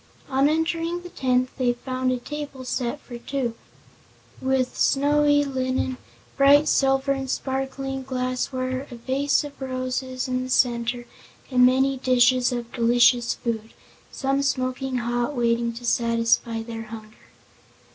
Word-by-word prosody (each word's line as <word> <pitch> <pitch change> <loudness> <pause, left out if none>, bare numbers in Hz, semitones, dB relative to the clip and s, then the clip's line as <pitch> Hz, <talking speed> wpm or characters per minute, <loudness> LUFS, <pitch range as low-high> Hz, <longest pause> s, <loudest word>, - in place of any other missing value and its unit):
On 270 +1 +3
entering 330 +2 -1
the 355 - -8
tent 255 -1 +1
they 245 -1 +2
found 255 +1 -2
a 255 - 0
table 285 0 -7
set 250 +2 -2
for 240 -2 -9
two, 255 -2 -2 0.9
with 260 -1 0
snowy 290 +1 +3
linen, 260 -1 -1 0.4
bright 285 +2 +6
silver 270 0 +2
and 270 -1 -2
sparkling 270 0 -3
glassware, 255 +1 -2
a 245 - -8
vase 270 +5 0
of 285 -1 -10
roses 255 0 -3
in 255 0 -1
the 255 - -6
center 240 -1 +1 0.5
and 250 -1 +6
many 265 +1 +2
dishes 255 0 +3
of 240 -1 -4
delicious 240 0 +3
food, 225 -2 -4 0.4
some 275 0 0
smoking 255 -1 -1
hot, 240 +3 -1
waiting 235 -1 +1
to 240 +1 -9
satisfy 230 -1 +1
their 225 -1 -7
hunger. 215 0 -12
255 Hz, 135 wpm, -24 LUFS, 240-270 Hz, 0.9 s, bright